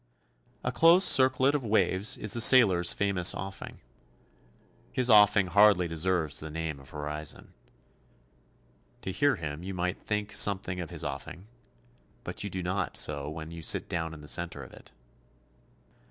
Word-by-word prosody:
A - - -1
close 170 +4 +5
circlet 130 +1 +4
of 145 -3 -1
waves 100 -2 +1
is 110 - -1
the 115 - 0
sailor's 100 -9 +5
famous 95 -3 +1
offing. 95 +1 -8 1.1
His 125 -1 0
offing 105 -2 +6
hardly 100 -1 +4
deserves 85 -2 -1
the 80 - -7
name 80 -2 -5
of 65 -1 -16
horizon. 75 +1 -7 1.5
To 95 - -4
hear 145 +6 +1
him 80 -4 -6
you 95 +1 -6
might 90 +1 -3
think 105 0 -3
something 95 -2 0
of 85 -3 -6
his - - -7
offing, 90 +6 -7 0.8
but - - -7
you 100 - -4
do 95 -1 -5
not 95 +1 -3
so 75 -1 -2
when 80 +1 -8
you 85 0 -9
sit - - -1
down 80 -1 -4
in 75 - -12
the 75 - -13
centre 85 -2 -2
of 65 - -14
it. - - -16
90 Hz, 155 wpm, -28 LUFS, 80-105 Hz, 1.5 s, offing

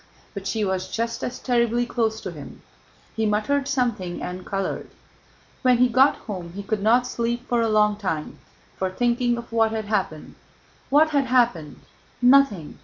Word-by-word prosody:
But 200 -2 -6
she 215 0 -1
was 190 -1 -2
just 230 0 -3
as 250 - -3
terribly 240 -1 +1
close 225 -2 -1
to 185 - -5
him. 150 -4 -11 0.5
He 220 -1 0
muttered 245 +7 0
something 235 -10 -1
and 180 +1 -6
colored. 195 0 -3 0.7
When 250 -1 +4
he 250 +1 +4
got 260 +4 +4
home 180 -6 -6
he 200 +2 -6
could 210 0 -2
not 235 +4 +4
sleep 240 0 -3
for 240 -1 +1
a 225 - +1
long 210 -1 +3
time 165 -7 -4 0.4
for 190 - -1
thinking 240 +4 0
of 235 0 -8
what 225 -1 +3
had 220 -1 -3
happened. 210 +1 -2 0.6
What 310 +3 +4
had 280 -2 +2
happened? 235 - +1 0.4
Nothing. 245 - +3
225 Hz, 170 wpm, -23 LUFS, 200-245 Hz, 0.7 s, When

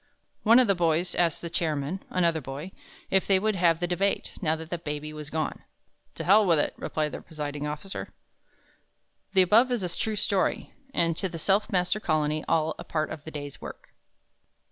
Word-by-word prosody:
One 230 +2 +6
of 255 - +6
the 200 - +4
boys 175 0 +1
asked 170 -2 +1
the 170 - -3
Chairman 155 +1 -1
another 170 -3 +1
boy 140 +7 -7 0.4
if 190 0 +2
they 195 - +5
would 215 +2 +1
have 170 -3 +3
the 175 - 0
Debate, 185 +3 0
now 160 -3 +2
that 160 +1 -9
the 175 - -2
Baby 150 -1 -5
was 150 -1 -7
gone? 155 +1 -3 0.5
"To - - -4
hell 205 +4 +6
with 165 -2 +5
it," 145 - +1
replied 155 -1 -2
the - - -6
Presiding 150 -2 -5
Officer. 150 +6 -6 1.2
The 190 -2 +6
above 225 +7 +5
is 240 -5 0
a 175 - -2
true 220 -1 -1
story, 195 -1 0 0.2
and 165 -8 +1
to 190 - -1
The 170 - -6
Self 195 +7 +1
Master 180 +2 +1
Colony, 155 -4 0
all 160 -1 +2
a - - -5
part 155 -1 -2
of 155 -2 -7
the - - -5
day's 145 -2 -7
work. - - -9
170 Hz, 195 wpm, -27 LUFS, 155-190 Hz, 1.2 s, One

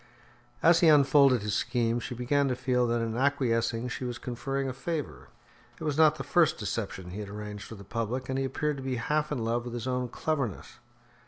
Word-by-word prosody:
As 170 0 +6
he 170 - +5
unfolded 140 -5 +5
his 105 -1 -2
scheme, 115 +2 0
she 125 +1 -6
began 140 +4 +1
to 130 - 0
feel 125 -1 +1
that 120 0 0
in 115 -1 -2
acquiescing 120 -3 +1
she 125 - -5
was 120 -1 -3
conferring 135 +3 -3
a 130 - -3
favour. 135 - -4 0.5
It - - -7
was 150 -2 -1
not 155 0 +5
the - - -5
first 165 -3 +3
deception 95 -4 -4
he 100 - -6
had 105 -2 -6
arranged 105 0 -7
for 115 - -9
the 100 - -11
public, 115 +5 -3
and 130 0 -1
he 135 - 0
appeared 145 +2 -1
to 135 - -7
be 130 -1 -2
half 150 +6 -1
in 125 -6 -2
love 120 +1 0
with 120 0 -6
his 120 0 -4
own 125 -1 -1
cleverness. 135 - -3
125 Hz, 220 wpm, -29 LUFS, 115-140 Hz, 0.5 s, As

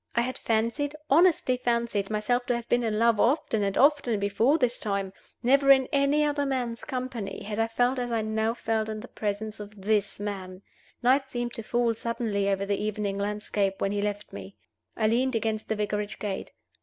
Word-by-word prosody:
I 235 - +4
had 255 +2 -3
fancied, 235 +7 0 0.2
honestly 315 -5 +4
fancied, 235 -5 0
myself 220 +3 0
to 245 - +2
have 235 -1 -5
been 240 - +2
in 220 -2 -1
love 230 -1 +3
often 235 -3 +2
and 195 -1 0
often 275 -6 +3
before 220 +9 +2
this 250 -4 0
time. 200 -3 -2 0.3
Never 275 +3 +4
in 265 -1 +7
any 280 +2 +3
other 290 -1 0
man's 250 -4 -2
company 255 -7 -4
had 210 +1 -4
I 225 - +2
felt 245 +3 +1
as 245 -1 -3
I 225 -2 0
now 220 +1 0
felt 220 -2 -1
in 215 0 -4
the 245 - -9
presence 215 0 -4
of 210 0 -10
this 205 0 0
man. 195 -2 -5 0.4
Night 265 +2 +3
seemed 240 -1 -3
to - - -6
fall 235 +1 +1
suddenly 220 -3 -1
over 195 0 0
the 200 +1 -1
evening 210 -2 -2
landscape 205 -1 -1
when 195 - 0
he 205 0 -1
left 205 0 -3
me. 195 - -9 0.4
I 220 - +1
leaned 245 +3 +2
against 220 -1 -2
the 220 - +1
Vicarage 210 0 -2
gate. 200 -2 -4
225 Hz, 195 wpm, -27 LUFS, 205-250 Hz, 0.4 s, in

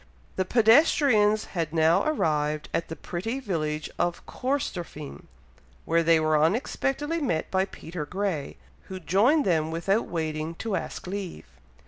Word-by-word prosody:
The 185 - 0
pedestrians 225 - +4
had 165 -4 -2
now 160 0 +4
arrived 155 - 0
at 170 - -1
the 160 - -6
pretty 205 - -4
village 155 - -2
of 175 0 -1
Corstorphine, 180 - -4 0.6
when 165 0 +2
they 165 -1 +6
were 155 -1 +2
unexpectedly 270 - 0
met 165 - -1
by 190 0 +2
Peter 165 -5 -7
Grey, 185 -5 -3 0.3
who 190 -1 -7
joined 225 - +3
them 160 -4 +1
without 180 +7 0
waiting 160 -1 -3
to 215 +2 -3
ask - - -5
leave. 190 -1 -5
180 Hz, 135 wpm, -26 LUFS, 160-220 Hz, 0.6 s, they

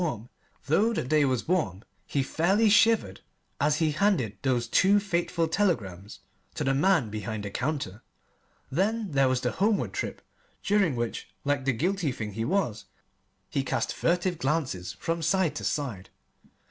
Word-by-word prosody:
Though 205 +10 +3
the - - -1
day 150 +3 +3
was 130 0 -1
warm 135 - 0 0.2
he 140 - 0
fairly 195 +10 +2
shivered 210 - +3 0.4
as 145 +1 +3
he 160 -2 +2
handed 155 - +1
those 125 -3 0
two 195 - +4
fateful 170 -4 -1
telegrams 105 - -1 0.3
to 155 - -2
the 135 -1 +2
man 140 - +2
behind 105 0 -4
the 100 - -5
counter. 125 -5 -3 0.7
Then 205 +6 0
there 135 -2 +3
was 130 -1 0
the 125 - 0
homeward 205 +2 0
trip, - - -4 0.4
during 200 -8 +2
which, 120 -1 -3 0.2
like 145 -2 0
the 135 - +3
guilty 175 - 0
thing 110 -3 -5
he 115 +2 -2
was, 135 - -1 0.6
he 135 - -1
cast - - -1
furtive 175 0 0
glances 130 - -1
from 165 - -3
side 170 0 +2
to - - -5
side. 120 -11 -3
145 Hz, 155 wpm, -27 LUFS, 120-185 Hz, 0.7 s, two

